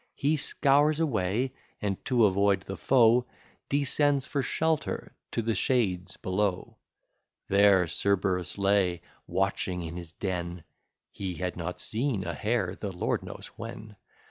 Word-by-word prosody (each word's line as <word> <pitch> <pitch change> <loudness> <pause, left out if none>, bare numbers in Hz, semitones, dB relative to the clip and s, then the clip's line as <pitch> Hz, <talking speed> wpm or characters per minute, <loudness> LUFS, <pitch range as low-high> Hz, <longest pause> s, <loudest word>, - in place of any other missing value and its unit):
He 145 +3 +1
scours 145 +1 +3
away; 125 - 0 0.3
and, 100 -2 -3
to 120 -4 +4
avoid 100 0 +3
the 95 - -6
foe, 120 +3 +4 0.4
Descends 140 0 +2
for 140 - -1
shelter 160 +3 -1 0.2
to 115 - -2
the 115 +1 +1
shades 95 -8 0
below: 95 0 -1 0.7
There 100 -2 +5
Cerberus 90 +1 0
lay 100 -3 +2 0.2
watching 95 -1 -1
in 85 +1 -6
his 85 -2 -7
den, 90 -3 -4 0.5
(He 95 -3 -5
had 90 +1 -3
not 90 +1 -5
seen 115 -3 0
a - - -3
hare 105 -5 -1
the 100 -1 -5
lord 90 - -1
knows - - -9
when.) 110 -2 -8
100 Hz, 135 wpm, -28 LUFS, 90-125 Hz, 0.7 s, There